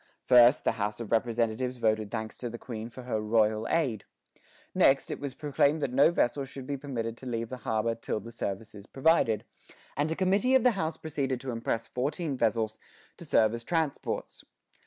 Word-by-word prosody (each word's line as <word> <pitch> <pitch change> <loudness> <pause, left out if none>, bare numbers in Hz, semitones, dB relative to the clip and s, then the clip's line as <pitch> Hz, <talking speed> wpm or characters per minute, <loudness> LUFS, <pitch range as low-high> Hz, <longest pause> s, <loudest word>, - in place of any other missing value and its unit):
First, 125 +2 +6
the - - +3
House 105 +1 -2
of 115 -3 -6
Representatives 115 +2 0
voted 110 -2 +1
thanks 110 0 -4
to 120 - -4
the 120 - -7
Queen 115 -1 -7
for 125 +2 -10
her 115 -3 -2
"royal 110 0 +2
aid." 135 -11 0 0.7
Next, 135 0 +3
it - - -4
was 140 -2 -5
proclaimed 145 0 +1
that 125 - -1
no 140 +4 +6
vessel 140 -4 +1
should 135 -1 -8
be 140 +1 -3
permitted 120 -5 -4
to 130 - -9
leave 115 -2 -3
the 130 - -5
harbor 110 0 0
"till 115 -1 -3
the 115 +3 -10
service 110 -1 -5
is 100 0 -12
provided;" 135 -6 +2 0.5
and 145 +3 0
a 160 - -1
committee 200 +8 +2
of 260 - +4
the 250 - +6
House 165 -6 -2
proceeded 135 -5 -2
to 135 -2 -4
impress 115 0 -2
fourteen 145 +4 -2
vessels 110 -2 0 0.4
to - - -10
serve 110 -1 +3
as 115 0 -5
transports. 160 -1 -2
120 Hz, 195 wpm, -29 LUFS, 110-140 Hz, 0.7 s, First